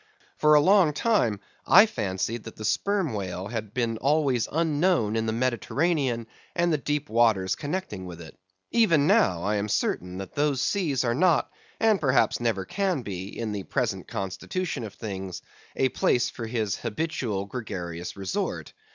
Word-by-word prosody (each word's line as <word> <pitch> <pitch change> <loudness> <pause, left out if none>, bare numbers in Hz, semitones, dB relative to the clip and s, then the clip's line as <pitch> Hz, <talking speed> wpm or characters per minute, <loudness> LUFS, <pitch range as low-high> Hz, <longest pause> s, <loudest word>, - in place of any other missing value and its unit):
For 150 0 +6
a - - +8
long 185 -2 +5
time 145 - +1 0.2
I 195 +4 +8
fancied 105 - -3
that 115 - -9
the 110 - -6
sperm 195 - 0
whale 95 -1 -4
had 110 -3 -4
been 115 -1 -1
always 140 -3 +2
unknown 155 - +1
in 110 0 0
the - - +1
Mediterranean 130 +2 0 0.3
and 170 -1 +2
the 150 - +1
deep 150 +1 -2
waters 110 -5 +2
connecting 145 - -4
with 85 -1 -9
it. 80 -2 -11 0.4
Even 170 -11 +4
now 175 - +3
I 105 +2 +1
am 105 +1 -2
certain 90 -2 -1
that 95 0 -7
those 145 -2 +1
seas 145 -3 0
are 120 -1 +1
not, 170 +4 +2 0.3
and 220 -3 +3
perhaps 135 -3 +2
never 110 -6 -1
can 185 - -1
be, 95 -3 -5
in 115 -2 -3
the 105 -1 -3
present 110 -4 -2
constitution 120 - -3
of 100 - -9
things, 95 -4 -6 0.3
a 130 - +2
place 120 - +1
for 115 - -6
his 110 -4 -1
habitual 115 -5 -2
gregarious 90 -6 -6
resort. 95 -1 -3
120 Hz, 165 wpm, -26 LUFS, 100-155 Hz, 0.4 s, a